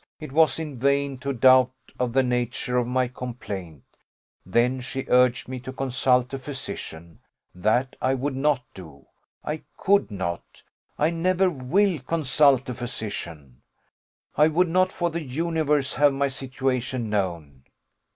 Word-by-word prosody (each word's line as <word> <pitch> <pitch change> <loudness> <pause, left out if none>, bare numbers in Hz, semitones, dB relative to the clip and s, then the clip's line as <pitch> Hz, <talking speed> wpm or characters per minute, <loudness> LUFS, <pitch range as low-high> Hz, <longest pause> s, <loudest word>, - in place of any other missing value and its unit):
it 155 -3 -8
was 160 +2 +4
in 150 -6 -6
vain 140 +1 +1
to 140 +2 -4
doubt 130 0 +5 0.3
of 125 -1 0
the 135 +2 +3
nature 125 0 -1
of 125 -1 +1
my 125 0 +1
complaint: 100 - -7 0.6
then 120 +7 +1
she 135 +1 -4
urged 125 -1 +3
me 130 0 -5
to 125 +2 -7
consult 130 -1 +1
a 135 - -3
physician; 85 - -7 0.3
that 110 +8 0
I 130 +1 +2
would 135 +1 -2
not 135 -1 +1
do 80 -7 -12 0.4
I 150 +1 -4 0.2
could 200 +1 +2
not 90 -4 -5 0.3
I 155 +3 +2
never 185 +2 +2
will 170 +6 +1
consult 140 -2 +2
a 125 - -3
physician, 95 - -6 0.7
I 150 +2 +5
would 170 +3 +2
not 185 +2 +2
for 175 -2 -1
the 165 0 -3
universe 150 0 0
have 145 +1 +4
my 140 +1 0
situation 130 -2 -2
known. 85 -10 -3
130 Hz, 145 wpm, -25 LUFS, 120-145 Hz, 0.7 s, doubt